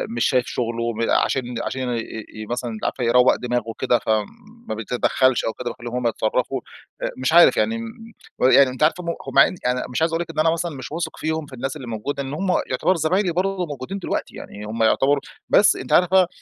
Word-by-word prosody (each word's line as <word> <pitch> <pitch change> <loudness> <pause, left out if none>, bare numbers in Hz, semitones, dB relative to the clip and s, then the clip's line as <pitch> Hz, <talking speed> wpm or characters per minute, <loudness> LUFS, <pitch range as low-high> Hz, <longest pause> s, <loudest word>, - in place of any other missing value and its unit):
مش 120 - +1
شايف 125 -2 +2
شغله 115 -1 -2
م 115 +1 -1
عشان 125 -2 +1
عشان 130 -1 -3 0.4
ي 110 0 -7
مثلًا 120 0 -3
أنتِ 110 - -8
عارفة 125 - -2
يروَّق 125 +2 +5
دماغه 120 -1 -2
وكده 120 +2 0
فما 110 -1 0 0.5
بيتدخّلش 125 +3 +1
أو 110 - -1
كده 120 +2 -5
وبيخلّيهم 120 0 -7
هم 125 -1 0
يتصرّفوا. 125 +3 -1 0.4
آآ - - -2
مش 130 +3 0
عارف 170 0 +7
يعني 230 - +1
م 230 0 -9 0.3
و - - +2
يعني 135 0 +6
أنتِ 130 +4 -2
عارفة 165 +4 +2
هم 170 - -3 0.2
هم - - -4
يعني - - +6
أنا 125 0 0
مش 125 - -3
عايز 165 +1 +2
أقول 165 - 0
لِك 170 - -5
إن 155 - -5
أنا 160 +1 +4
مثلًا 165 -1 -3
مش 130 0 -8
واثق 160 0 -4
فيهم 160 0 -2
في 140 - -15
الناس 130 +3 -4
اللي 135 -5 -8
موجودة 115 +6 -3
لإن 135 +1 -6
هم 185 +5 -1 0.2
يعتبروا 155 +8 +2
زمايلي 175 +4 +1
برضو 185 +2 -1
وموجودين 150 +4 -5
دلوقتي - - -4
يعني 105 +1 -9
هم 115 +2 -2
يعتبروا 135 +5 +3 0.3
بس 205 - +5
أنتِ - - -4
عارفة 180 +1 +5
130 Hz, 220 wpm, -22 LUFS, 120-165 Hz, 0.5 s, عارف